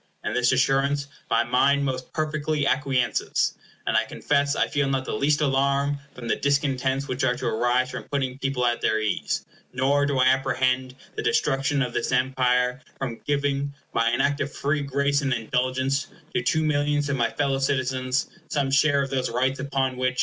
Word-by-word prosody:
In -, -, -1 dB
this 125 Hz, 0 st, +3 dB
assurance 135 Hz, +2 st, +2 dB, 0.2 s
my 115 Hz, -, +3 dB
mind 140 Hz, +3 st, +2 dB
most 130 Hz, -1 st, -3 dB
perfectly 155 Hz, -1 st, -1 dB
acquiesces, 135 Hz, -3 st, +1 dB, 0.3 s
and -, -, 0 dB
I -, -, +4 dB
confess 140 Hz, +1 st, 0 dB
I -, -, +2 dB
feel 145 Hz, -2 st, 0 dB
not 135 Hz, -1 st, -1 dB
the -, -, -4 dB
least 145 Hz, +7 st, +1 dB
alarm 140 Hz, 0 st, +1 dB, 0.2 s
from 120 Hz, -2 st, -7 dB
the -, -, +2 dB
discontents 135 Hz, -1 st, 0 dB
which 130 Hz, +1 st, -2 dB
are 125 Hz, -1 st, +2 dB
to 130 Hz, +1 st, -6 dB
arise 120 Hz, +3 st, +1 dB
from -, -, -6 dB
putting 135 Hz, -2 st, -2 dB
people 135 Hz, -3 st, 0 dB
at 120 Hz, 0 st, 0 dB
their 110 Hz, -, +2 dB
ease, 110 Hz, -3 st, -1 dB, 0.3 s
nor 140 Hz, +3 st, +2 dB
do 140 Hz, -2 st, 0 dB
I 130 Hz, -, +4 dB
apprehend 130 Hz, -1 st, +1 dB, 0.2 s
the -, -, -2 dB
destruction 135 Hz, 0 st, +1 dB
of 125 Hz, -1 st, -4 dB
this 120 Hz, -, -1 dB
Empire 125 Hz, 0 st, +1 dB, 0.2 s
from 125 Hz, -4 st, -5 dB
giving, 140 Hz, -1 st, 0 dB, 0.2 s
by 115 Hz, 0 st, +2 dB
an 120 Hz, -, +1 dB
act 145 Hz, 0 st, +1 dB
of 140 Hz, -, -2 dB
free 145 Hz, +1 st, -1 dB
grace 140 Hz, +1 st, +1 dB
and 135 Hz, -2 st, -1 dB
indulgence, 130 Hz, +4 st, -1 dB, 0.3 s
to 185 Hz, -, +1 dB
two 155 Hz, -3 st, +1 dB
millions 145 Hz, -1 st, +1 dB
of 140 Hz, -, 0 dB
my 120 Hz, -3 st, +1 dB
fellow 140 Hz, -2 st, 0 dB
citizens 130 Hz, -1 st, 0 dB, 0.2 s
some 140 Hz, -2 st, 0 dB
share 140 Hz, 0 st, +4 dB
of 135 Hz, -, -6 dB
those 130 Hz, -1 st, 0 dB
rights 130 Hz, +3 st, 0 dB
upon 135 Hz, -2 st, -1 dB
which. 125 Hz, 0 st, -1 dB
135 Hz, 185 wpm, -25 LUFS, 130-140 Hz, 0.3 s, I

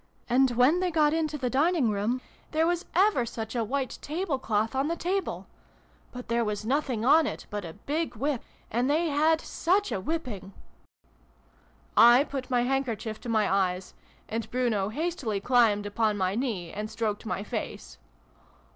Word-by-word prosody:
And, 260 Hz, +2 st, +4 dB
when 275 Hz, +8 st, +5 dB
they 365 Hz, 0 st, +1 dB
got 310 Hz, -2 st, +3 dB
into 310 Hz, -2 st, -1 dB
the 255 Hz, -4 st, -2 dB
dining 290 Hz, -3 st, +2 dB
room, 215 Hz, +5 st, -1 dB, 0.3 s
there 320 Hz, +1 st, +3 dB
was 350 Hz, +1 st, 0 dB
ever 385 Hz, -, +4 dB
such 225 Hz, 0 st, -6 dB
a 235 Hz, -, +1 dB
white 265 Hz, +4 st, -3 dB
table 315 Hz, -2 st, -2 dB
cloth 220 Hz, -1 st, 0 dB
on 270 Hz, +2 st, 0 dB
the 335 Hz, -, -1 dB
table! 370 Hz, +3 st, -2 dB, 0.7 s
But 250 Hz, 0 st, -8 dB
there 235 Hz, 0 st, +1 dB
was 210 Hz, -1 st, -3 dB
nothing 255 Hz, -3 st, 0 dB
on 305 Hz, +3 st, +6 dB
it -, -, -5 dB
but 205 Hz, -1 st, -3 dB
a 165 Hz, -2 st, -7 dB
big 310 Hz, -1 st, -1 dB
whip. 270 Hz, +2 st, -1 dB, 0.3 s
And 245 Hz, +4 st, +1 dB
they 320 Hz, +3 st, +2 dB
had 310 Hz, +2 st, +3 dB
such 390 Hz, +5 st, 0 dB
a -, -, -1 dB
whipping 210 Hz, -, -4 dB, 0.8 s
!" -, -, -34 dB, 0.2 s
(I 265 Hz, -, +5 dB
put 275 Hz, -3 st, -6 dB
my 245 Hz, -2 st, +2 dB
handkerchief 240 Hz, -4 st, -2 dB
to 245 Hz, -, -6 dB
my 215 Hz, -2 st, +2 dB
eyes, 185 Hz, -1 st, 0 dB, 0.3 s
and 225 Hz, +1 st, -4 dB
Bruno 230 Hz, -6 st, 0 dB
hastily 280 Hz, -, -2 dB
climbed 220 Hz, -3 st, +3 dB
upon 210 Hz, 0 st, 0 dB
my 185 Hz, -1 st, 0 dB
knee 210 Hz, -8 st, -2 dB
and 210 Hz, +1 st, -5 dB
stroked 220 Hz, -1 st, -3 dB
my 185 Hz, +1 st, -2 dB
face. 65 Hz, -, -6 dB
250 Hz, 175 wpm, -28 LUFS, 215-300 Hz, 0.8 s, on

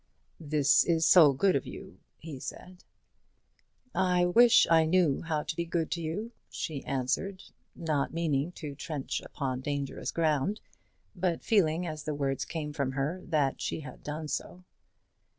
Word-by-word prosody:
"This 150 Hz, -1 st, +3 dB
is 165 Hz, -1 st, +2 dB
so 160 Hz, -6 st, +8 dB
good 185 Hz, +8 st, +2 dB
of 135 Hz, -, -1 dB
you," -, -, -10 dB, 0.2 s
he 150 Hz, -4 st, -8 dB
said. 180 Hz, +6 st, -9 dB, 1.1 s
"I 180 Hz, -1 st, +2 dB
wish 230 Hz, +7 st, +6 dB
I 165 Hz, -1 st, +5 dB
knew 165 Hz, -4 st, +2 dB
how 155 Hz, -2 st, -2 dB
to -, -, -4 dB
be 170 Hz, -, -1 dB
good 165 Hz, -1 st, -2 dB
to 170 Hz, -, -2 dB
you," 190 Hz, +9 st, -4 dB, 0.2 s
she 145 Hz, -4 st, -5 dB
answered, 135 Hz, +9 st, -2 dB, 0.3 s
not 155 Hz, -4 st, -1 dB
meaning 160 Hz, -2 st, 0 dB
to 150 Hz, -4 st, -7 dB
trench 145 Hz, -1 st, -4 dB
upon 130 Hz, -2 st, -4 dB
dangerous 140 Hz, 0 st, -3 dB
ground, 160 Hz, +5 st, 0 dB, 0.6 s
but 175 Hz, -2 st, -1 dB
feeling, 180 Hz, -5 st, +2 dB
as 155 Hz, -2 st, -6 dB
the 150 Hz, -1 st, -2 dB
words 135 Hz, -2 st, -1 dB
came 150 Hz, -3 st, -5 dB
from 140 Hz, -3 st, -2 dB
her, 145 Hz, +7 st, -2 dB
that 145 Hz, -5 st, 0 dB
she -, -, -3 dB
had 130 Hz, -4 st, -10 dB
done 150 Hz, +1 st, -5 dB
so. 180 Hz, +4 st, -5 dB
155 Hz, 155 wpm, -29 LUFS, 145-175 Hz, 1.1 s, so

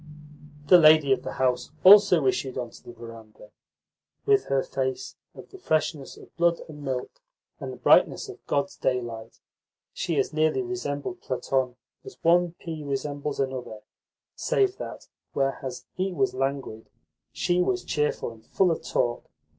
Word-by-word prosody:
The 175 Hz, +5 st, +7 dB
lady 155 Hz, -3 st, +6 dB
of -, -, -2 dB
the -, -, -6 dB
house 125 Hz, -1 st, 0 dB
also 190 Hz, -5 st, +8 dB
issued 130 Hz, 0 st, -1 dB
on 120 Hz, -2 st, -4 dB
to -, -, -16 dB
the -, -, -10 dB
verandah. 115 Hz, -2 st, -13 dB, 0.7 s
With 410 Hz, -1 st, +3 dB
her 135 Hz, -1 st, +1 dB
face 130 Hz, -1 st, -3 dB, 0.2 s
of -, -, -13 dB
the 385 Hz, -, -12 dB
freshness 155 Hz, -, -1 dB
of -, -, -16 dB
"blood 170 Hz, 0 st, +2 dB
and 150 Hz, -2 st, -11 dB
milk" 135 Hz, -, -4 dB, 0.4 s
and -, -, -6 dB
the -, -, -9 dB
brightness -, -, +4 dB
of 395 Hz, -1 st, -11 dB
God's 140 Hz, 0 st, -1 dB
daylight, 120 Hz, -3 st, -3 dB, 0.5 s
she 170 Hz, -5 st, -2 dB
as 135 Hz, -, 0 dB
nearly 155 Hz, -, +1 dB
resembled 180 Hz, -, -4 dB
Platon 130 Hz, 0 st, -1 dB, 0.3 s
as -, -, -11 dB
one 175 Hz, 0 st, +3 dB
pea 160 Hz, -3 st, -7 dB
resembles 145 Hz, +1 st, -4 dB
another, 130 Hz, -5 st, -4 dB, 0.5 s
save 400 Hz, -6 st, +1 dB
that, -, -, -8 dB, 0.3 s
whereas 135 Hz, -2 st, -2 dB
he 190 Hz, +1 st, -2 dB
was 195 Hz, +2 st, 0 dB
languid, 135 Hz, -4 st, -3 dB, 0.4 s
she 175 Hz, 0 st, 0 dB
was 180 Hz, 0 st, 0 dB
cheerful 150 Hz, -5 st, -1 dB
and 110 Hz, -1 st, -16 dB
full 185 Hz, +6 st, +2 dB
of 165 Hz, -, -2 dB
talk. 120 Hz, 0 st, -2 dB
145 Hz, 155 wpm, -26 LUFS, 130-175 Hz, 0.7 s, also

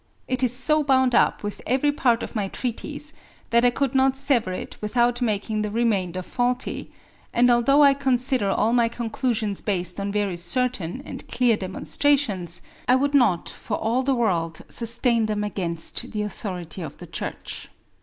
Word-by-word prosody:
It 255 Hz, 0 st, 0 dB
is 250 Hz, -3 st, +3 dB
so 300 Hz, +5 st, +1 dB
bound 260 Hz, -2 st, +3 dB
up -, -, +3 dB
with 205 Hz, 0 st, -5 dB
every 265 Hz, +4 st, +2 dB
part 245 Hz, -5 st, +1 dB
of -, -, -7 dB
my 205 Hz, -3 st, 0 dB
treatise 285 Hz, +8 st, -5 dB, 0.4 s
that 235 Hz, +1 st, +4 dB
I 245 Hz, -, +6 dB
could 265 Hz, +1 st, -1 dB
not 265 Hz, 0 st, +3 dB
sever 270 Hz, -8 st, +1 dB
it 185 Hz, -, -6 dB
without 240 Hz, +3 st, +1 dB
making 215 Hz, -1 st, 0 dB
the 210 Hz, -, -2 dB
remainder 200 Hz, -5 st, 0 dB
faulty; 245 Hz, +4 st, -2 dB, 0.4 s
and 245 Hz, +1 st, +4 dB
although 275 Hz, +5 st, +5 dB
I 280 Hz, -1 st, +7 dB
consider 260 Hz, -4 st, +1 dB
all 215 Hz, +4 st, +2 dB
my 240 Hz, -1 st, +4 dB
conclusions 230 Hz, -3 st, -2 dB
based 180 Hz, -2 st, -2 dB
on 200 Hz, 0 st, -2 dB
very 200 Hz, -3 st, -1 dB
certain 180 Hz, 0 st, -2 dB
and -, -, -8 dB
clear 240 Hz, -2 st, +3 dB
demonstrations, 195 Hz, -, 0 dB, 0.2 s
I 250 Hz, -, +5 dB
would 280 Hz, +2 st, +1 dB
not 225 Hz, -11 st, +3 dB
for -, -, -3 dB
all 230 Hz, +4 st, 0 dB
the 270 Hz, 0 st, +1 dB
world 170 Hz, -9 st, 0 dB
sustain 235 Hz, -1 st, +2 dB
them 210 Hz, -1 st, -1 dB
against 170 Hz, -5 st, -3 dB
the 210 Hz, -1 st, -1 dB
authority 185 Hz, -4 st, -5 dB
of 155 Hz, -4 st, -7 dB
the -, -, -10 dB
Church.'" -, -, -6 dB
235 Hz, 170 wpm, -24 LUFS, 200-255 Hz, 0.4 s, I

